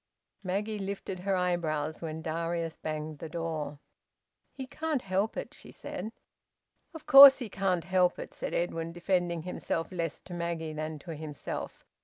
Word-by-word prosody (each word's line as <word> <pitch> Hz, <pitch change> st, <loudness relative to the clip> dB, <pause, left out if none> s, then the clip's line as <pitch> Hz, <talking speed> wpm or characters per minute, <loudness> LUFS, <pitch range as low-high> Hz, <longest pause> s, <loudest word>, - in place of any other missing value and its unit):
Maggie 205 Hz, +3 st, -2 dB
lifted 195 Hz, -1 st, -4 dB
her 195 Hz, +1 st, 0 dB
eyebrows 160 Hz, -4 st, -1 dB
when 160 Hz, -1 st, -5 dB
Darius 165 Hz, 0 st, -2 dB
banged 155 Hz, -1 st, -5 dB
the 165 Hz, -, -6 dB
door. 155 Hz, -3 st, -3 dB, 0.7 s
"He 265 Hz, -, -7 dB
can't 305 Hz, 0 st, -2 dB
help 195 Hz, +3 st, 0 dB
it," -, -, -5 dB
she -, -, -10 dB
said. 220 Hz, -, -6 dB, 0.8 s
"Of 320 Hz, -, -9 dB
course 275 Hz, 0 st, +11 dB
he 245 Hz, -5 st, -5 dB
can't 190 Hz, -3 st, 0 dB
help 180 Hz, 0 st, +3 dB
it," -, -, -7 dB
said -, -, -4 dB
Edwin, 165 Hz, -1 st, -1 dB
defending 175 Hz, -1 st, 0 dB
himself, 165 Hz, -1 st, -3 dB
less 165 Hz, -3 st, -3 dB
to 180 Hz, -, -10 dB
Maggie 170 Hz, -2 st, -3 dB
than 155 Hz, 0 st, -4 dB
to 165 Hz, +3 st, -8 dB
himself. 150 Hz, -1 st, -6 dB
170 Hz, 155 wpm, -30 LUFS, 160-195 Hz, 0.8 s, course